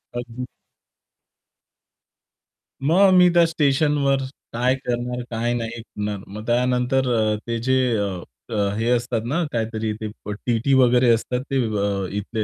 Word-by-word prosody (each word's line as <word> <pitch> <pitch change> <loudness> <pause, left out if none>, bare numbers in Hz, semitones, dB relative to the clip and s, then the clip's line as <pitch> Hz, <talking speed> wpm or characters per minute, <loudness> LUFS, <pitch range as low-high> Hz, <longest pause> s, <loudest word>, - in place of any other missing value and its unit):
अगदी. 120 +1 -5 2.4
मग 190 +5 +5
मी 180 -1 +7
त्या 170 -1 +6
स्टेशनवर 145 -2 +2 0.4
काय 125 +2 +2
करणार 125 -1 -3
काय 120 +1 -1
नाही 115 -1 -4
करणार. 105 -2 -5
मग 105 +2 -8
त्यानंतर 125 +2 +1
अ, 110 -2 +2
ते 115 - -1
जे 130 +2 +1 0.2
अ, 100 +3 -6 0.2
हे 115 +2 0
असतात 120 -1 0
ना, 160 +8 0
काहीतरी 110 -1 -2
ते 110 - -2 0.4
टीटी 120 +3 +1
वगैरे 125 -1 +5
असतात 125 +2 -1
ते - - 0 0.6
इथले 105 +2 -3
120 Hz, 125 wpm, -22 LUFS, 115-130 Hz, 2.4 s, मी